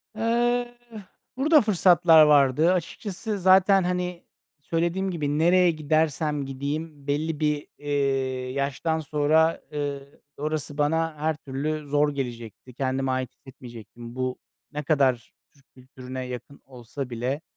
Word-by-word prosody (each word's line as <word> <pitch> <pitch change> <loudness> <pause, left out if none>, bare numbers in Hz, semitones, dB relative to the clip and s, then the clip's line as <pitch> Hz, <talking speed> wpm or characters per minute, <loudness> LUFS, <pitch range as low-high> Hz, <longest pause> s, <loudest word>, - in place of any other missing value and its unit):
Eh, 240 +2 +1 0.7
burada 300 +2 +5
fırsatlar 175 -5 +5
vardı 150 +3 +4
açıkçası, 200 +4 -4
zaten, 190 +1 +5
hani, 180 -1 -3 0.4
söylediğim 170 +5 -1
gibi, 150 -3 -2
nereye 175 +2 +4
gidersem 155 -1 0
gideyim 145 +2 -5
belli 150 +2 -1
bir, 150 -1 -1
eee, 135 -3 -1
yaştan 140 +4 -1
sonra, 155 +2 +2
ııı, 140 -1 -5 0.2
orası 150 -1 -3
bana 160 +2 0
her 155 +1 -1
türlü 150 +1 -4
zor 145 +1 +2
gelecekti, 120 -2 -7
kendime 130 +1 -1
ait 130 -1 -2
hissetmeyecektim. 120 -3 -12
Bu, 130 0 -2 0.3
ne 150 0 -4
kadar 135 -5 +1 0.2
Türk 140 -2 -27
kültürüne 130 0 -8
yakın 125 +3 -9
olsa 125 +1 -8
bile, 125 +5 -3
145 Hz, 120 wpm, -25 LUFS, 135-165 Hz, 0.7 s, burada